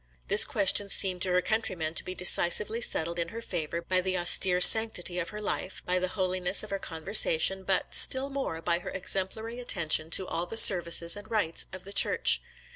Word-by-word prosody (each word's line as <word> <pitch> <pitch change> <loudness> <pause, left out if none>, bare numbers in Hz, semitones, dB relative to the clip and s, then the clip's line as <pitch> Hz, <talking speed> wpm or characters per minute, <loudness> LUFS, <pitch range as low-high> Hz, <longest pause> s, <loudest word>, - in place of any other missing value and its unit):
This 205 +2 +4
question 205 -5 +1
seemed 185 -2 -1
to 185 - -2
her 180 0 -1
countrymen 185 -8 -4
to - - -4
be 185 - -9
decisively 190 +5 +2
settled 170 -5 0
in 170 - -4
her 225 +7 -10
favour, 170 -5 -7
by 185 +1 -2
the 185 0 -3
austere 180 +1 +3
sanctity 180 -3 +5
of 170 -1 -6
her 210 - -10
life, 200 -2 -5
by 180 0 -2
the 185 - -3
holiness 185 0 -2
of 215 - -12
her 195 - -5
conversation, 185 +1 0
but, 190 0 -3
still 265 +1 +2
more, 265 -13 -7
by 170 0 -2
her - - -10
exemplary 195 +5 -3
attention 165 -9 0
to 185 +3 +1
all 175 -1 -6
the 225 - -6
services 170 -4 +4
and 205 +1 -13
rites 205 -8 -2
of 185 0 -10
the 200 - -11
Church. - - +2
185 Hz, 200 wpm, -26 LUFS, 175-205 Hz, -, sanctity